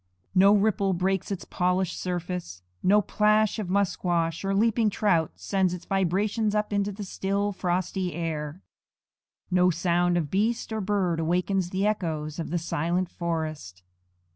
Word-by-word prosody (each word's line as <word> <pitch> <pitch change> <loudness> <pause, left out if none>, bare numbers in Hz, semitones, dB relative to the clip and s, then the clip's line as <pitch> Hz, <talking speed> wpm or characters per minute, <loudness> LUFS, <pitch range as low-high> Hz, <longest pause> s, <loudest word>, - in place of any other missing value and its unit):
No 195 +2 +6
ripple 200 -2 +2
breaks 190 +1 0
its 195 - -4
polished 180 0 0
surface; 175 - -4 0.2
no 205 +2 +4
plash 215 +2 +2
of 200 -4 -4
musquash 175 -4 0
or 195 0 0
leaping 225 +1 +3
trout 190 -6 +1
sends 190 -3 0
its 180 - -11
vibrations 200 +3 0
up 210 0 0
into 200 0 0
the 205 +1 -7
still, 200 +1 -1
frosty 185 -1 -2
air; 160 0 -4 0.9
no 180 0 +4
sound 175 +1 +1
of 155 -5 -2
beast 220 +3 0
or 220 - -1
bird 190 -4 0
awakens 180 +2 0
the 190 +2 -1
echoes 160 -7 -2
of 165 - -4
the 175 - 0
silent 170 +2 -1
forest. 155 - -4
185 Hz, 145 wpm, -26 LUFS, 170-200 Hz, 0.9 s, No